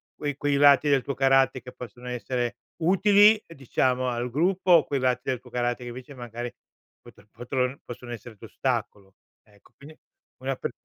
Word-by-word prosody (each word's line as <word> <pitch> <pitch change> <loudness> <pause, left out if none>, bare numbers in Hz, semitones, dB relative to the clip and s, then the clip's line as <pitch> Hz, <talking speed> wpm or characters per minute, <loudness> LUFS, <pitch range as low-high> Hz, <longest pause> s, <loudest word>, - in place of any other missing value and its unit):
quei 145 -2 -4
quei 145 -1 0
lati 145 0 +6
del 140 -2 +4
tuo 140 - -4
caratte 135 -1 +3
che 125 +1 -10
possono 125 0 -10
essere 120 +1 -3 0.3
utili, 205 +4 +6
ehm, 165 - -13
diciamo 130 -1 0
al 120 +1 -2
gruppo, 180 +5 +1
o 165 -3 +7
quei 140 -2 -1
lati 125 -1 +1
del 130 -2 -1
tuo 125 - -15
caratte 120 0 -1
che 120 - -6
invece 130 +3 -9
magari 120 -1 -6 0.5
pot - - -18
potron 125 +2 -2
possono 120 0 -9
essere 115 0 -10
d'ostacolo. 95 0 -4 0.3
Ecco 105 -2 -25
quindi 155 +3 -14 0.5
una 135 0 -1
per - - -4
130 Hz, 175 wpm, -26 LUFS, 120-145 Hz, 0.5 s, o